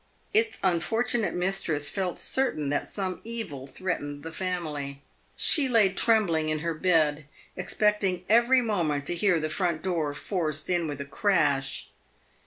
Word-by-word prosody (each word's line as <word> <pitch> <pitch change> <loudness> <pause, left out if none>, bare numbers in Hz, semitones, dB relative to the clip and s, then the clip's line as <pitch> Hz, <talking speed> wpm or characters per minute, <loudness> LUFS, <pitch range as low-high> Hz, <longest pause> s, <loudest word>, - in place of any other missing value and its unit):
Its 440 +1 +2
unfortunate 225 +6 0
mistress 175 -5 0
felt 185 -3 -2
certain 245 - 0
that 145 - -1
some 190 -2 -3
evil 210 - -6
threatened 145 -2 -4
the 165 - -6
family. 155 -6 -4 0.4
She 285 -4 +5
lay 215 -6 +4
trembling 185 -9 +2
in 155 - 0
her 165 - 0
bed, 155 -3 +1 0.3
expecting 190 -1 0
every 240 +4 +5
moment 160 -10 -1
to 175 - -1
hear 180 -1 +2
the 155 - -2
front 165 0 -1
door 165 -6 -1
forced 155 -2 -3
in 175 -2 +1
with 145 -2 -5
a - - -5
crash. 140 -5 0
175 Hz, 145 wpm, -27 LUFS, 150-205 Hz, 0.4 s, She